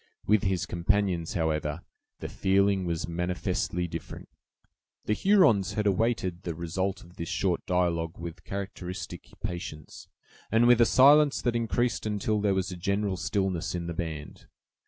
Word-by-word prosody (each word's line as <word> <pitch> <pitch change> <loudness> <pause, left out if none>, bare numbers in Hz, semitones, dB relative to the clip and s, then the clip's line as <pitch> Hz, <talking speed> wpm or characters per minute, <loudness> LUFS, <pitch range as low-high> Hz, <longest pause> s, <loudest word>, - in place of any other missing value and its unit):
With 105 0 +4
his 95 -2 0
companions, 90 -1 0
however, 80 -1 -1 0.4
the - - -3
feeling 95 0 +2
was 85 -2 -2
manifestly 90 0 -2
different. - - -8 0.8
The 105 - +1
Hurons 120 - +4
had 105 - -1
awaited 100 -3 0
the 85 -3 -4
result 95 +4 -3
of 85 +1 -18
this 85 - -5
short 90 -3 0
dialogue 85 -2 0
with 85 -1 -8
characteristic 95 -2 -6 0.2
patience, 80 -4 -6 0.4
and 115 +2 +4
with 120 -1 +6
a 115 - +6
silence 145 +2 +6
that 120 -2 +1
increased 120 0 0
until 105 0 0
there 100 -2 +2
was 95 0 -1
a 90 - -6
general 100 +2 -1
stillness 95 -3 -1
in 85 -1 -3
the 85 - -4
band. 80 -3 -6
95 Hz, 150 wpm, -28 LUFS, 85-105 Hz, 0.8 s, with